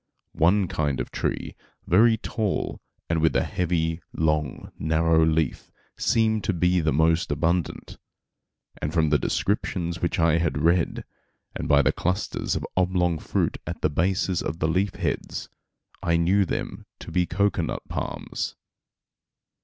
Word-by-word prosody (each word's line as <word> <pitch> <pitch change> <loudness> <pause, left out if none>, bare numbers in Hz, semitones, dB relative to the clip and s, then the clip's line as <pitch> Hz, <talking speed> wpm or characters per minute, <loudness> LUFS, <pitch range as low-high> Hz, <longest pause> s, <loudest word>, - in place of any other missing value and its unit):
One 95 +4 +3
kind 75 -5 -1
of - - -4
tree, - - -2 0.3
very 110 +6 +5
tall 110 -2 -2 0.3
and 80 -1 0
with 80 - +2
a - - +3
heavy 80 -1 -1
long 75 -3 -1
narrow 80 +1 +3
leaf 80 -3 0 0.2
seemed 110 -2 +1
to 100 - +1
be 90 +1 +2
the 80 -2 +1
most 80 +3 +2
abundant; 85 +3 -1 0.8
and 75 - -1
from 80 -3 +2
the 75 - +4
descriptions 85 -4 -1
which 85 - 0
I 80 0 +3
had 85 -3 0
read, 85 0 +2 0.5
and - - -3
by 70 0 +5
the 65 - +3
clusters 90 +4 -1
of - - -3
oblong 90 -2 +1
fruit - - -1
at - - -5
the - - +2
bases 90 +3 +1
of 80 - -3
the 80 - 0
leaf 95 +5 0
heads, - - -3 0.5
I 85 0 +2
knew 95 +4 +3
them - - -4
to - - -8
be 90 -1 +1
cocoanut 100 -5 -1
palms. - - -4
85 Hz, 145 wpm, -25 LUFS, 80-90 Hz, 0.8 s, very